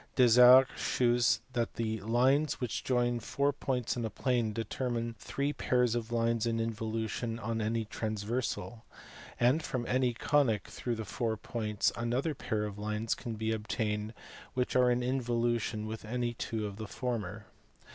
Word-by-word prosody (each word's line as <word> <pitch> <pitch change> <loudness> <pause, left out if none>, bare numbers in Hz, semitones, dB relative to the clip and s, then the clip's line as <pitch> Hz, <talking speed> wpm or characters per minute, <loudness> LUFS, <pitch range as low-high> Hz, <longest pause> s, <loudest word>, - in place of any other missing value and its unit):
Desargues 125 +1 +8
shews 120 -1 +2
that 120 -2 -1
the 110 -1 -2
lines 130 +7 +2
which 125 -4 -3
join 120 -1 +1
four 140 +5 0
points 130 -4 -1
in 120 - -3
a 110 - -1
plane 120 -2 0
determine 115 +1 -2
three 140 +8 -2
pairs 125 -4 +1
of 120 -1 -3
lines 115 -1 +1
in 115 0 0
involution 115 +1 -2
on 115 0 -2
any 110 +1 0
transversal, 110 +2 -3 0.6
and 125 +7 +4
from 125 -5 -3
any 125 0 +2
conic 125 -6 +2
through 120 -2 -3
the 110 -1 -5
four 110 -1 -2
points 105 -1 -1
another 125 +7 -1
pair 110 -5 -2
of 105 -1 -6
lines 105 +1 -1
can 115 -3 -5
be 110 +1 -1
obtained 105 0 -2 0.4
which 125 -1 -1
are 125 -1 +5
in 125 0 +1
involution 120 -3 0
with 110 +1 -6
any 120 +2 -2
two 110 -1 -3
of 100 -1 -6
the 110 0 -6
former. 110 -4 -4
115 Hz, 155 wpm, -31 LUFS, 110-125 Hz, 0.6 s, Desargues